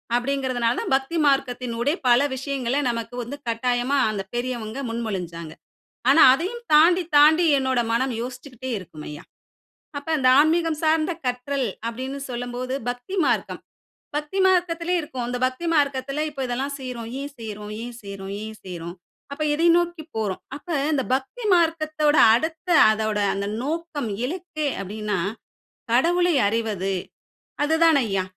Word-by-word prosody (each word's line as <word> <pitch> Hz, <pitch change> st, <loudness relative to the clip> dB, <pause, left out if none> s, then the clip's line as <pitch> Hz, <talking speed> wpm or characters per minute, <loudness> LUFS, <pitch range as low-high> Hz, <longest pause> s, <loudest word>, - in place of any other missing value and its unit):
அப்டிங்கறதுனால 250 Hz, -2 st, 0 dB
தான் -, -, -1 dB
பக்தி 270 Hz, +5 st, -1 dB
மார்க்கத்தனுடைய 250 Hz, -1 st, +1 dB
பல 245 Hz, +1 st, +6 dB
விஷயங்கள 265 Hz, -1 st, -2 dB
நமக்கு 230 Hz, 0 st, -4 dB
வந்து 260 Hz, +5 st, -7 dB
கட்டாயமா 245 Hz, +3 st, 0 dB
அந்த 210 Hz, -2 st, -2 dB
பெரியவங்க 240 Hz, -1 st, -3 dB
முன்மொழிஞ்சாங்க. 180 Hz, -8 st, -4 dB, 0.6 s
ஆனா 325 Hz, -, +7 dB
அதையும் 385 Hz, -, -4 dB
தாண்டி, 345 Hz, +4 st, +6 dB
தாண்டி 310 Hz, +4 st, +6 dB
என்னோட 260 Hz, -2 st, +1 dB
மனம் 255 Hz, +3 st, +1 dB
யோசிச்சுகிட்டே 255 Hz, +1 st, -7 dB
இருக்கும் 160 Hz, -5 st, -11 dB
ஐயா. 150 Hz, +3 st, -8 dB, 0.8 s
அப்ப 285 Hz, -, -11 dB
அந்த 255 Hz, -2 st, +3 dB
ஆன்மீகம் 320 Hz, +1 st, +3 dB
சார்ந்த 315 Hz, +1 st, +2 dB
கற்றல் 250 Hz, +2 st, -1 dB, 0.2 s
அப்டினு 260 Hz, +4 st, -5 dB
சொல்லும்போது 245 Hz, +1 st, -4 dB
பக்தி 245 Hz, +9 st, -5 dB
மார்க்கம். -, -, 0 dB, 0.6 s
பக்தி 300 Hz, +6 st, -2 dB
மார்க்கத்திலே 355 Hz, -2 st, +2 dB
இருக்கும். 260 Hz, -5 st, -5 dB
இந்த 245 Hz, -, -2 dB
பக்தி 260 Hz, +7 st, -3 dB
மார்க்கத்தில 280 Hz, -1 st, 0 dB
இப்ப 295 Hz, -, -12 dB
இதெல்லாம் 265 Hz, +4 st, -2 dB
செய்றோம். 245 Hz, -3 st, -6 dB
ஏன் 285 Hz, +1 st, -5 dB
செய்றோம்? 210 Hz, -2 st, -7 dB
ஏன் 245 Hz, 0 st, -7 dB
செய்றோம்? 195 Hz, -1 st, -7 dB
ஏன் 220 Hz, 0 st, -7 dB
செய்றோம்? 175 Hz, -2 st, -7 dB, 0.4 s
அப்ப 285 Hz, +2 st, -3 dB
எதை 330 Hz, +3 st, +2 dB
நோக்கி 345 Hz, -2 st, -1 dB
போறோம்? 210 Hz, -4 st, -2 dB
அப்ப 290 Hz, -, -12 dB, 0.3 s
இந்த 275 Hz, -3 st, +1 dB
பக்தி 275 Hz, -, -5 dB
மார்க்கத்தோட 310 Hz, -3 st, +2 dB, 0.2 s
அடுத்த 320 Hz, +7 st, -3 dB, 0.2 s
அதோட 215 Hz, -1 st, -1 dB
அந்த 200 Hz, +1 st, -3 dB, 0.2 s
நோக்கம், 305 Hz, -4 st, -3 dB, 0.2 s
இலக்கு 335 Hz, 0 st, -4 dB, 0.2 s
அப்டினா 210 Hz, 0 st, -3 dB, 0.7 s
கடவுளை 350 Hz, +7 st, +3 dB
அறிவது 205 Hz, -3 st, -1 dB, 0.7 s
அது 310 Hz, +2 st, +2 dB
தான் 320 Hz, -3 st, +5 dB
ஐயா, 195 Hz, -3 st, 0 dB
260 Hz, 135 wpm, -23 LUFS, 230-310 Hz, 0.8 s, ஆனா